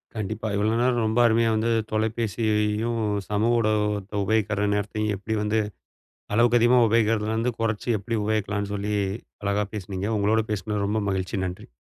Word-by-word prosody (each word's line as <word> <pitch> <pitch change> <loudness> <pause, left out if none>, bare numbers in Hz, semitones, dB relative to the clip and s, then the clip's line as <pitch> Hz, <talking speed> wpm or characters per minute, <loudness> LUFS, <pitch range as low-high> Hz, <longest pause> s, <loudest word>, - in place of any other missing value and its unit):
கண்டிப்பா. 110 +1 -3
இவ்ளோ 105 +2 +1
நேரம் 120 -2 +2
ரொம்ப 110 +2 +1
அருமையா 115 0 +3
வந்து 115 +2 +1 0.2
தொலைபேசியையும், 110 0 0 0.3
சமூக 110 +3 +2
ஊடகத்த 105 -2 0
உபயோகிக்கிற 105 0 +1
நேரத்தையும் 105 +1 -1
எப்பிடி 110 +3 -3
வந்து 110 +1 +1 0.8
அளவுக்கு 120 +1 +4
அதிகமா 120 +1 +5
உபயோகிக்கிறதிலருந்து 110 +1 +1
குறச்சு 115 0 -1
எப்பிடி 115 +3 -3
உபயோகிக்கலான்னு 105 -1 -1
சொல்லி 105 +1 -2 0.5
அழகா 100 +1 0
பேசினீங்க. 95 -1 -4
உங்களோட 110 +2 +2
பேசினது 105 0 -2
ரொம்ப 110 +2 0
மகிழ்ச்சி. 95 +2 -2
நன்றி. 90 0 -7
110 Hz, 135 wpm, -25 LUFS, 105-115 Hz, 0.8 s, அதிகமா